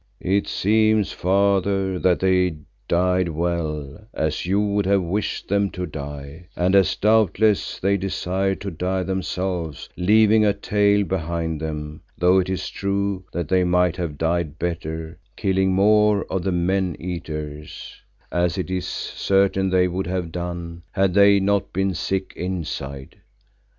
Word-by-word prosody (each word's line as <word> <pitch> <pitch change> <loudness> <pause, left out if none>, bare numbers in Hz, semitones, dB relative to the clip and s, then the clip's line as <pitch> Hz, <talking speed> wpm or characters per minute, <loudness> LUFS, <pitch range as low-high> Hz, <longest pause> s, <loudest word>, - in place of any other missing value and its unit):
"It 100 +2 +1
seems, 110 0 +2
Father, 95 0 +1
that 90 -1 +2
they 90 -2 +2 0.3
died 90 +1 +2
well, 80 -2 -3
as 80 +2 -1
you 100 +2 +2
would 100 -1 0
have 100 -1 +3
wished 95 +4 -2
them 100 0 +1
to 90 0 -3
die, 75 +1 -8
and 90 +2 +1
as 95 -2 +4
doubtless 110 -1 +2
they 100 +1 +2
desired 95 0 -1
to 100 -1 -4
die 90 +3 -2
themselves, 90 -3 -3
leaving 110 +3 +4
a 105 -1 +3
tale 100 0 +2
behind 85 -3 -3
them, 75 -1 -5 0.2
though 90 +2 +4
it 95 - -1
is 95 - -2
true 100 -1 -2
that 85 -3 -3
they 95 +1 +3
might 90 -1 +2
have 85 -5 -4
died 80 -1 -1
better, 80 -2 -4 0.2
killing 95 -1 +1
more 105 +1 +4
of 95 - 0
the 95 - -1
men 90 0 0
eaters, 75 -4 -6 0.4
as 90 +1 0
it 95 0 -3
is 90 -1 -2
certain 95 0 0
they 90 0 +3
would 90 0 -3
have 90 -2 -3
done, 85 -1 -5
had 95 -2 +2
they 100 0 +6
not 100 0 0
been 95 +1 0
sick 95 +2 -2
inside. 75 -7 -5
90 Hz, 145 wpm, -22 LUFS, 85-100 Hz, 0.4 s, they